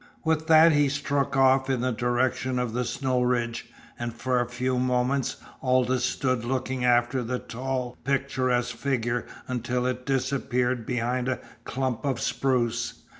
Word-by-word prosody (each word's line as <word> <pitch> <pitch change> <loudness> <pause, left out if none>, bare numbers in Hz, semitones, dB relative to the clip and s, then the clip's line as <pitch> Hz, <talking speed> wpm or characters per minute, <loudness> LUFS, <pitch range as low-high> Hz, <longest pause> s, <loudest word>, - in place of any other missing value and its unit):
With 160 -1 0
that 160 0 +7
he 145 -2 +3
struck 140 -1 -1
off 130 0 +4
in 130 -3 +1
the 130 0 +1
direction 125 +2 0
of 125 -2 -1
the 125 +1 -1
snow 130 +1 0
ridge, 120 -1 -1 0.3
and 120 0 -2
for 125 +2 0
a 120 - -3
few 125 +1 -1
moments 125 +1 0 0.2
Aldous 130 -1 +2
stood 130 -3 0
looking 130 +1 -2
after 120 +1 +3
the 125 +1 -2
tall, 125 0 -4
picturesque 130 -2 0
figure 120 -1 -1 0.2
until 125 0 -1
it 125 0 -3
disappeared 130 -3 0
behind 125 +1 -1
a 130 - -1 0.3
clump 130 -3 -2
of 135 -4 -1
spruce. 125 0 -1
125 Hz, 150 wpm, -26 LUFS, 120-135 Hz, 0.3 s, that